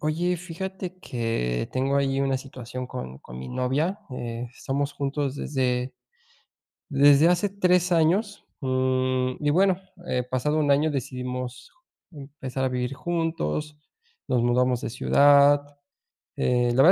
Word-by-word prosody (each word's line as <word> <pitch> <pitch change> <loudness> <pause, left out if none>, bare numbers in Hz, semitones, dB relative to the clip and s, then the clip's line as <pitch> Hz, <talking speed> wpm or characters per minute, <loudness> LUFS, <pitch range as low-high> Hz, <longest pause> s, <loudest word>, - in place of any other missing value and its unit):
Oye, 170 +4 0
fíjate 185 +2 -6
que 115 - -2
tengo 135 +2 +1
allí 135 -1 +1
una 135 -1 +1
situación 130 -1 -7
con 65 - -7
con 60 -1 -11
mi 65 0 -7
novia, 140 +10 -1
eh, 120 -1 -5
estamos 140 +1 -2
juntos 140 -1 -2
desde 130 -3 -1 0.9
desde 145 +1 +6
hace 180 +3 +2
3 180 -2 +2
años, 180 +6 +1 0.2
mm, 130 -1 0
y, - - +4
bueno, 185 +4 +4 0.3
eh, 125 0 0
pasado 150 +5 0
un 145 -2 +2
año 150 +3 +2
decidimos 125 -2 -5 0.4
empezar 135 -4 -5
a - - +2
vivir 125 +1 -2
juntos, 160 - -2 0.5
nos 125 -2 +2
mudamos 125 0 +2
de - - -4
ciudad, 140 +3 +5 0.8
eh, 125 -1 +2
la 125 +2 +4
verdad 170 - +8
135 Hz, 135 wpm, -25 LUFS, 125-155 Hz, 0.9 s, verdad